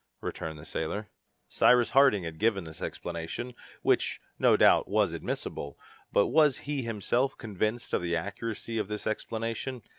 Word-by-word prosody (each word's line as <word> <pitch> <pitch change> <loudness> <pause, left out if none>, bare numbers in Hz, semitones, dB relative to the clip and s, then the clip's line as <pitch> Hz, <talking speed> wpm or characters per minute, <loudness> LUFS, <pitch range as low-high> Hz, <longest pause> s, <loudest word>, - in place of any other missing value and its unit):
returned 80 -1 -5
the 75 - -11
sailor. 105 +8 -4 0.4
Cyrus 125 -1 +4
Harding 135 -8 +5
had 80 -1 -6
given 105 -4 +2
this 80 -1 -10
explanation, 85 +9 -5 0.3
which, - - +2 0.2
no - - +5
doubt, - - +5
was 100 -4 +2
admissible. 70 -3 -4 0.3
But 100 - +4
was 150 -4 +4
he 145 -1 -1
himself 115 +3 0
convinced 110 +2 -2
of - - +2
the 85 -1 0
accuracy 110 +5 -3
of 105 - -1
this 105 0 -5
explanation? 115 +3 -3
105 Hz, 150 wpm, -29 LUFS, 85-120 Hz, 0.4 s, Harding